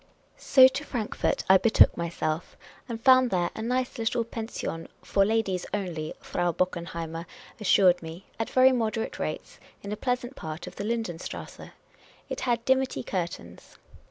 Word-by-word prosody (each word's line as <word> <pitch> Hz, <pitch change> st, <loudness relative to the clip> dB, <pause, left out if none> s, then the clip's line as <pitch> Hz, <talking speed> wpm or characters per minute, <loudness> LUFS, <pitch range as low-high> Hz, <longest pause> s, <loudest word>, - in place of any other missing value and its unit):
So 260 Hz, -1 st, +7 dB
to 260 Hz, +2 st, -3 dB
Frankfort 235 Hz, -7 st, -2 dB
I 190 Hz, 0 st, +7 dB
betook 230 Hz, -, +5 dB
myself, 165 Hz, -1 st, -3 dB, 0.3 s
and 230 Hz, -1 st, -4 dB
found 255 Hz, 0 st, +6 dB
there 175 Hz, -3 st, 0 dB
a -, -, -6 dB
nice 250 Hz, +2 st, -1 dB
little 230 Hz, +1 st, 0 dB
/>e7is/on 220 Hz, -7 st, -5 dB
— -, -, -37 dB
" -, -, -37 dB
for 195 Hz, -, +2 dB
ladies 200 Hz, -4 st, 0 dB
only," 170 Hz, -6 st, -4 dB
Frau 175 Hz, 0 st, -1 dB
Bockenheimer 170 Hz, -1 st, -3 dB, 0.3 s
assured 185 Hz, -3 st, +4 dB
me 165 Hz, +3 st, -9 dB
— -, -, -33 dB
at 225 Hz, -, -2 dB
very 260 Hz, 0 st, +5 dB
moderate 225 Hz, -2 st, -2 dB
rates, -, -, -5 dB, 0.2 s
in 200 Hz, -, -6 dB
a -, -, -1 dB
pleasant 250 Hz, +2 st, -2 dB
part 155 Hz, -, -7 dB
of 180 Hz, -, -11 dB
the 200 Hz, -, -4 dB
Linden 220 Hz, -6 st, -2 dB
strasse. -, -, -8 dB, 0.6 s
It -, -, -4 dB
had 235 Hz, -2 st, 0 dB
dimity 265 Hz, 0 st, +1 dB
curtains. 170 Hz, -, -6 dB
210 Hz, 165 wpm, -27 LUFS, 175-240 Hz, 0.6 s, So